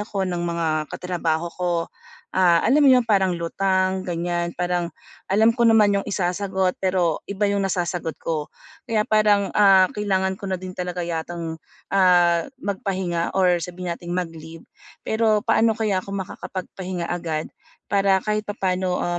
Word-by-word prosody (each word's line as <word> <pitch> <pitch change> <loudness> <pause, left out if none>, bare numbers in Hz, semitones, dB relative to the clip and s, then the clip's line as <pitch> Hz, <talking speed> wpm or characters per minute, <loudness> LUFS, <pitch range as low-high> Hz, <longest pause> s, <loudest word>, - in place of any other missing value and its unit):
ako 205 -2 -3
ng 175 -1 -2
mga 170 -1 -1 0.3
katrabaho 170 -2 -2
ko, 180 -1 0 0.6
ah, 175 -3 +4
alam 280 +6 +4
mo - - +7
yun, 250 - +4
parang 190 -4 +2
lutang 185 +2 0
ganiyan. 175 0 -2
Parang 175 -1 -1 0.4
alam 215 +4 +4
ko 235 -2 +3
naman 210 -3 +5
yung - - -10
isasagot 190 0 -1
pero 185 -4 +1
iba 200 +1 0
yung 200 -1 0
nasasagot 175 -3 -2
ko. 155 -3 -2 0.4
Kaya 215 -2 +1
parang, 210 -2 +3
ah, 195 -2 +7
kailangan 190 -2 -1
ko 200 - -7
na 185 - +1
din 185 0 -7
talaga 180 -1 -4
yatang, 165 0 -4 0.4
ah, 175 -3 +4 0.2
magpahinga 190 -4 -2
or 180 -2 +3
sabihin 180 0 -5
nating 175 0 -6
mag-leave. 165 -2 -6 0.4
Pero 220 -1 +2
paano 225 0 +3
kaya 210 -4 0
ako 195 - -10
makakapagpahinga 185 -2 -5
agad 165 -3 -3 0.4
para 195 -1 +3
kahit 215 0 -1
papaano 185 -3 -1
185 Hz, 145 wpm, -23 LUFS, 175-200 Hz, 0.6 s, mo